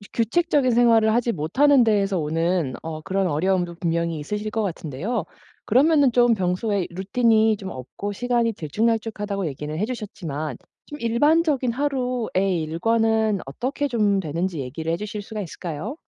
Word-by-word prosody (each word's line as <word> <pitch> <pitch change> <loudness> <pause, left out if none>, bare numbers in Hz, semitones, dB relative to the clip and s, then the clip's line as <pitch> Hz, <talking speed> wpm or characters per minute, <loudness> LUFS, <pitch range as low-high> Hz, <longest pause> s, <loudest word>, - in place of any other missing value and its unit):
이 205 - -13
규칙적인 275 +2 +2
생활을 230 -2 +4
하지 235 0 +1
못하는 255 - +3
데에서 200 -5 +2
오는 165 -1 0
어 160 -1 -5
그런 190 +3 -1
어려움도 175 +2 0
분명히 170 -2 -1
있으실 210 +7 -4
것 225 - 0
같은데요. 180 - -3 0.4
그러면은 280 +2 +4
좀 240 -1 +4
평소에 190 +1 0
이 - - -7
"루틴이 220 +2 +2
좀 195 -1 -7
없고 130 +11 -6
시간이 235 +1 0
들쭉날쭉하다."고 210 +2 -1
얘기는 150 +2 -5
해 190 - 0
주셨지만 165 - -5 0.3
좀 295 - -9
일반적인 275 +2 +2
하루의 245 - 0
일과는 220 +5 +1
어떻게 260 - -3
좀 210 -5 +2
되는지 165 0 -2
얘기를 160 +6 -4
해 - - 0
주실 210 +2 -5
수가 215 +1 -6
있을까요? 170 - -6
205 Hz, 370 characters per minute, -23 LUFS, 170-235 Hz, 0.4 s, 생활을